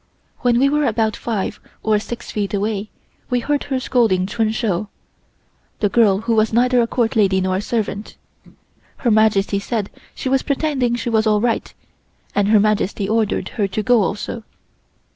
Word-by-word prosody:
When 240 -1 +2
we 270 +3 +4
were 295 +1 +1
about 220 -1 0
five 220 -5 -3 0.2
or 215 -1 +2
six 235 +3 -7
feet 205 -1 -2
away 210 +1 -2 0.4
we 250 - +1
heard 290 +4 -1
her 270 -2 -1
scolding 225 -8 +2
Chun 220 +2 0
Shou 215 -3 -1 0.9
(the 205 - +2
girl 205 -2 +3
who 230 +1 0
was 220 0 +2
neither 245 +2 +3
a 230 - +1
Court 230 -1 0
lady 195 -3 +3
nor 185 0 0
a - - -2
servant). 215 -2 -3 0.8
Her 240 - +1
Majesty 210 -2 +3
said 205 0 -3 0.2
she - - -5
was 265 0 +2
pretending 275 -4 0
she 240 0 -3
was 220 0 +2
all 210 -1 +3
right, 230 +1 -1 0.6
and 205 -1 +2
Her 215 0 +5
Majesty 205 -1 0
ordered 220 0 0
her 205 -4 -1
to 210 +3 -3
go 240 +1 +4
also. 210 +3 -3
220 Hz, 175 wpm, -20 LUFS, 205-240 Hz, 0.9 s, Her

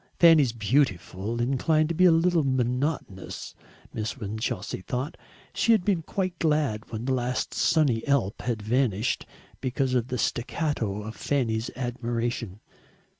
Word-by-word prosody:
Fanny's 160 -7 +7
"beautiful" 110 - 0
inclined 145 +6 +2
to - - 0
be 185 +3 +4
a 180 - +8
little 165 0 +3
monotonous, 130 -5 -2 0.4
Miss 110 0 -3
Winchelsea 105 -3 -3
thought. 125 +8 -3 0.4
She 230 - +3
had 210 -5 +2
been 190 -5 +2
quite 185 +1 -3
glad 150 -9 0
when 110 +1 -4
the 130 - +1
last 125 0 -1
sunny 145 -9 +2
Alp 135 -8 +1
had 115 -4 -2
vanished, 115 -1 0 0.3
because 130 0 -1
of 125 -2 +1
the 125 - -3
staccato 120 -5 -1
of 110 +1 -7
Fanny's 115 -5 -1
admiration. 120 -4 -3
125 Hz, 135 wpm, -27 LUFS, 110-150 Hz, 0.4 s, a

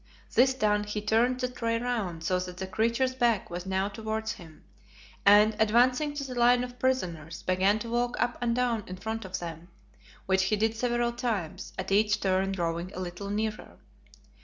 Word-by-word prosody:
This 260 +2 +4
done 210 -4 +1
he 210 0 -3
turned 230 +4 +2
the 250 - +1
tray 230 -2 -1
round 220 -9 -2
so 180 +2 +1
that 180 0 -6
the 190 - -3
creature's 230 +6 0
back 235 -7 +1
was 175 +2 -5
now 190 +1 0
towards 220 +1 -3
him, 160 -3 -12 0.6
and, 210 +1 +7
advancing 250 +7 +3
to 285 - -3
the 265 -2 -6
line 245 0 +4
of 245 0 -8
prisoners, 170 -11 -2
began 190 +3 +2
to 230 +1 -6
walk 240 +1 0
up 245 0 +1
and 235 -1 +1
down 240 -3 0
in 185 - -7
front 220 +1 -4
of 190 0 -4
them, 170 -1 -7 0.6
which 190 0 +2
he 215 - +2
did 220 +2 0
several 240 0 0
times, 230 -9 -3
at 190 +1 -4
each 210 +1 +3
turn 190 0 +1
drawing 170 -1 -2
a - - -5
little 185 +2 -5
nearer. 215 +1 -3
215 Hz, 185 wpm, -28 LUFS, 190-240 Hz, 0.6 s, and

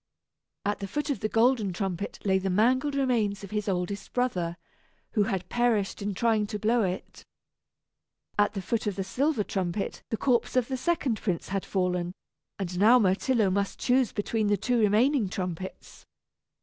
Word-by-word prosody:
At 205 +1 0
the 200 - -4
foot 295 +7 -2
of 275 - -2
the 215 - -1
golden 225 -3 +3
trumpet 190 0 -3
lay 190 -1 +3
the 190 0 -2
mangled 255 +9 +2
remains 225 -7 +1
of 200 - -8
his 210 -1 -1
oldest 185 +2 -3
brother, 180 -9 -1 0.5
who 210 -4 +2
had 190 -4 -2
perished 230 -4 +1
in 200 -1 -2
trying 220 0 +2
to 210 - -3
blow 225 +3 +2
it. 185 -2 -4 1.1
At 205 0 +2
the 195 - -3
foot 225 +2 -1
of 205 - -1
the 195 - -2
silver 260 +4 0
trumpet 190 0 -3
the 225 - -1
corpse 250 0 +1
of 255 -1 +2
the 265 - -1
second 265 - 0
prince 185 -5 -2
had 195 0 -2
fallen; 180 -2 -1 0.4
and 180 -3 -3
now 225 +5 +7
Myrtillo 210 +1 +2
must 200 +1 -1
choose 250 -2 +2
between 215 0 -1
the 205 0 +3
two 245 +5 +1
remaining 220 +2 +3
trumpets! 185 -1 -6
210 Hz, 175 wpm, -28 LUFS, 190-240 Hz, 1.1 s, now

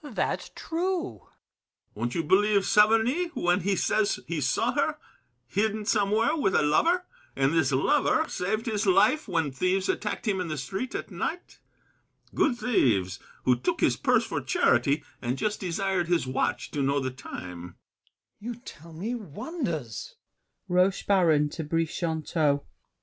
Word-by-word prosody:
ROCHEBARON. 285 -7 -10
That's - - -1
true. 360 +2 -2
BRICHANTEAU. - - -27 0.7
Won't 120 +3 -3
you 165 - 0
believe 200 +4 +3
Saverny 225 +10 +4
when 175 0 +2
He 195 +3 0
says 215 +2 +1
he 160 -2 -3
saw 125 - +1
her, - - 0 0.5
hidden 210 - -1
somewhere 215 +5 +2
with 230 - +1
A - - +4
lover, 335 - +2 0.3
and 135 +2 +2
this 160 -5 +2
lover 295 - +2
saved 215 +5 -2
his 215 -3 -1
life 210 +11 +4
When 165 -6 0
thieves 185 +7 0
attacked 215 +3 -2
him 195 -3 +1
in 180 - -3
the 155 -1 -3
street 190 - -4
at - - -5
night?— 355 - -5 0.7
Good 250 -5 +2
thieves, 100 - +1 0.2
who 125 - +4
took 120 - -2
his - - +3
purse - - +2
for - - -3
charity, 145 +2 +2 0.2
And 125 +1 -2
just 210 +9 -1
desired 185 0 -1
his 175 -3 +1
watch 130 0 -1
to 145 - -2
know 140 +1 +1
the 130 -1 -2
time. 90 -9 -8
GASSÉ. 90 - -15 0.7
You 240 +1 -4
tell 170 - -13
me 200 +9 -4
wonders! 180 - -5
190 Hz, 145 wpm, -27 LUFS, 145-225 Hz, 0.7 s, Saverny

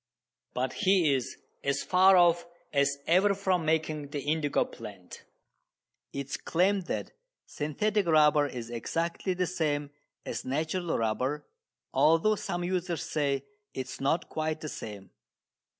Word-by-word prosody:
But 130 +1 -1
he 185 -7 +3
is 130 -3 -2 0.3
as 140 0 0
far 190 +1 +6
off 175 -1 +4 0.3
as 140 0 +2
ever 195 +4 +4
from 185 -4 0
making 155 -2 0
the 145 0 -4
indigo 145 0 +1
plant. 100 -6 -11 0.9
It 140 0 -4
is 135 - -4
claimed 185 +2 +1
that - - -3 0.3
"synthetic" 200 +7 -1
rubber 150 -2 +5
is 120 -3 -7
exactly 170 - -2
the 180 0 +1
same 150 -5 -1 0.3
as - - -4
natural 160 +6 -1
rubber, 125 +6 -1 0.5
although 165 +7 +4
some 175 -3 -3
users 180 -2 -1
say 140 -3 -1 0.3
it 130 - -3
is 130 - -9
not 140 +5 +1
quite 155 0 -2
the 155 - -4
same. 100 -7 -8
155 Hz, 135 wpm, -29 LUFS, 140-175 Hz, 0.9 s, far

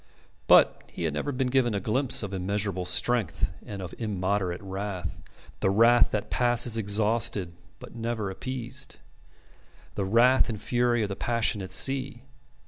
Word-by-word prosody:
But - - +5
he - - -6
had 80 -3 -1
never 75 - -2
been 130 -1 -1
given 125 -4 +1
a - - 0
glimpse 125 +5 0
of 100 -1 -5
immeasurable 95 0 -2
strength 100 0 0
and 100 -2 -7
of 90 - -8
immoderate 95 -4 -2
wrath, 95 -2 -5 0.4
the - - +1
wrath 115 +4 +5
that 105 -2 -4
passes 120 -1 +2
exhausted 105 -3 +2 0.2
but - - -12
never 115 -4 -3
appeased 130 +5 -5 1.0
the 100 - -2
wrath 120 +6 +4
and 110 -3 -4
fury 120 0 +1
of 105 - -3
the 100 - -4
passionate 110 -5 -1
sea. 135 -2 0
110 Hz, 145 wpm, -27 LUFS, 95-120 Hz, 1.0 s, But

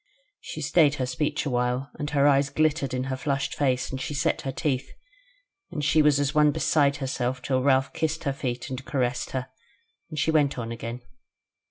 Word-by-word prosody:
She - - -7
stayed 150 -4 +4
her 130 - -1
speech 145 +4 -1
a 140 - -1
while, 125 +2 -1
and 150 - -2
her 145 -1 +3
eyes 140 -1 +4
glittered 155 -1 +1
in 130 0 -1
her 130 0 -2
flushed 135 0 -1
face 130 -3 0
and 130 0 -4
she 145 - -4
set 140 - 0
her 135 - -3
teeth; 135 -2 -2 0.8
and 150 -4 -3
she 155 +2 +4
was 150 -2 +4
as 145 0 0
one 150 -1 +5
beside 145 -1 +2
herself 130 -2 -2
till 130 -1 +1
Ralph 135 0 +2
kissed 160 0 -1
her 140 -3 0
feet, 125 -2 -4
and 130 +1 -5
caressed 125 -3 -1
her, 130 0 -4 0.6
and 155 - -7
she 155 +2 +2
went 145 -4 +2
on 115 -1 -4
again. 115 +1 -6
140 Hz, 200 wpm, -26 LUFS, 130-145 Hz, 0.8 s, one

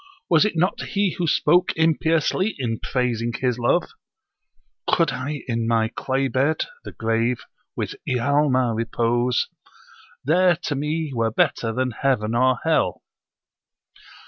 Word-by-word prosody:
Was 165 +4 +5
it 210 - -1
not 180 +4 +1
he 200 -2 0
who 170 - 0
spoke 175 +4 +3
impiously 165 +5 +1
[in 115 -5 -2
praising 120 -2 -1
his 125 -1 -1
love]? 120 +9 +1 1.0
'Could 165 -2 +3
I 145 +3 -4
in 115 -2 -1
my 115 -1 +2
clay 135 +3 -1
bed 140 +4 +1 0.2
[the - - -8
grave] 115 +2 0 0.3
with - - -3 0.2
Ialma 130 -1 +2
repose, 120 +2 0 0.8
There 175 +4 +4
to 150 - -1
me 150 +2 -2
were 115 -2 +1
better 115 +1 +1
than 125 +2 -1
Heaven 115 -3 0
or 130 +1 +3
Hell!' 160 -1 +1
130 Hz, 130 wpm, -23 LUFS, 120-160 Hz, 1.0 s, Was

